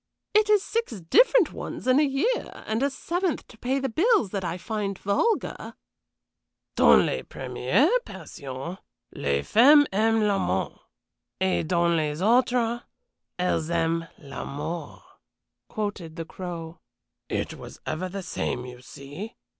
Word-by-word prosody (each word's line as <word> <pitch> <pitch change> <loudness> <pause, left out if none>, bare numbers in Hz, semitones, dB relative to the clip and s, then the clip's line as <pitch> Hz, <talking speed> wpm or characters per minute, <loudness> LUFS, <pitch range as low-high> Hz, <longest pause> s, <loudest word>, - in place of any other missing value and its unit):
It 425 0 +4
is 415 -2 +5
six 460 - -2
different 420 - +4
ones - - -6
in 255 +2 +4
a - - +5
year, 295 - 0 0.2
and 220 +2 -1
a 280 - +2
seventh 345 +5 -2
to - - -14
pay 260 +2 0
the 270 0 -1
bills, 325 - +2
that 195 -2 -3
I 170 0 -2
find 200 0 -3
vulgar." 205 - -1 1.0
"Dans - - +6
les - - -1
premières - - +1
passions, 140 - -8 0.3
les 70 0 -1
femmes 290 +6 +7
aiment 220 +2 +3
l'amant; 95 - 0 0.7
et 190 -3 +1
dans 170 0 +2
les 150 -1 -1
autres, 240 +1 +2 0.6
elles 180 -3 0
aiment 165 0 0
l'amour," 145 +2 -6 0.7
quoted 205 -7 -4
the 165 - -5
Crow. 170 -2 -7 0.5
"It - - -2
was - - -11
ever 180 +4 -3
the 195 +1 -5
same, 125 -7 -3
you 125 -1 -10
see. 145 - -9
195 Hz, 135 wpm, -26 LUFS, 165-265 Hz, 1.0 s, femmes